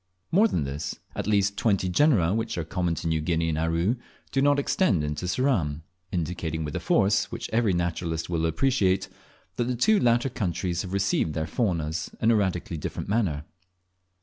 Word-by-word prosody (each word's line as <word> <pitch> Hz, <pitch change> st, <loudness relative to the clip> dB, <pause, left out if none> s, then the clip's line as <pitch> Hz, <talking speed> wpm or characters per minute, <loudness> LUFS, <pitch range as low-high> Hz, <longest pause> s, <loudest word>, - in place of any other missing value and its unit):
More 205 Hz, +6 st, +5 dB
than 80 Hz, -, -1 dB
this, 70 Hz, +3 st, -4 dB, 0.2 s
at -, -, -3 dB
least 100 Hz, -1 st, +2 dB
twenty 100 Hz, -4 st, +2 dB
genera, 95 Hz, -, +3 dB
which 115 Hz, -2 st, -2 dB
are 85 Hz, -, -1 dB
common 85 Hz, +1 st, -1 dB
to 85 Hz, -, -4 dB
New 80 Hz, -1 st, +1 dB
Guinea 80 Hz, +1 st, 0 dB
and 75 Hz, -, -1 dB
Aru, 85 Hz, +8 st, +1 dB, 0.3 s
do 135 Hz, -, +1 dB
not 145 Hz, +1 st, +4 dB
extend 135 Hz, -, +2 dB
into 75 Hz, +4 st, -3 dB
Ceram, 90 Hz, -, 0 dB, 0.3 s
indicating 85 Hz, -3 st, -2 dB
with 75 Hz, -, -5 dB
a -, -, 0 dB
force 100 Hz, +1 st, +2 dB
which 115 Hz, 0 st, -5 dB
every 110 Hz, -4 st, +3 dB
naturalist 85 Hz, -2 st, -2 dB
will 80 Hz, -2 st, 0 dB
appreciate, 95 Hz, -, +1 dB, 0.5 s
that 120 Hz, -, +1 dB
the 125 Hz, +1 st, -1 dB
two 205 Hz, -, +4 dB
latter 120 Hz, +2 st, +3 dB
countries 90 Hz, -5 st, -2 dB
have 95 Hz, -1 st, -6 dB
received 95 Hz, -5 st, +1 dB
their 80 Hz, -1 st, -1 dB
faunas 80 Hz, -3 st, -1 dB
in 115 Hz, -, +3 dB
a -, -, +4 dB
radically 90 Hz, -4 st, -1 dB
different 75 Hz, -, -5 dB
manner. 90 Hz, -10 st, 0 dB
90 Hz, 180 wpm, -26 LUFS, 80-115 Hz, 0.5 s, More